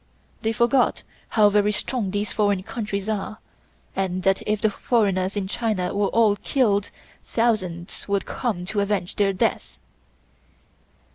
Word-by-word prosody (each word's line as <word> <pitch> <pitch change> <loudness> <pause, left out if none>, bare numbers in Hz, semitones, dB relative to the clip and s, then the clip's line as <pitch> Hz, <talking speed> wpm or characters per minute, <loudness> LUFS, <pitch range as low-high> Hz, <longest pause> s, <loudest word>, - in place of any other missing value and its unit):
They 225 - +1
forgot 240 +2 +2 0.3
how 210 -2 +5
very 205 0 +3
strong 210 0 -1
these 205 +2 -2
foreign 205 -3 +1
countries 205 -2 -4
are, 215 0 -3 0.6
and 185 -1 -1
that 195 +1 +2
if 210 0 +1
the 215 0 +2
foreigners 200 -5 +1
in 195 -2 -1
China 210 -4 -1
were 200 0 +1
all 215 -2 +3
killed, 205 -3 +1 0.3
thousands 185 -7 -1
would 200 -1 0
come 205 -8 -3
to 205 +3 -1
avenge 200 -3 -1
their 200 -1 +3
death. 185 - -1
205 Hz, 140 wpm, -24 LUFS, 195-220 Hz, 0.6 s, how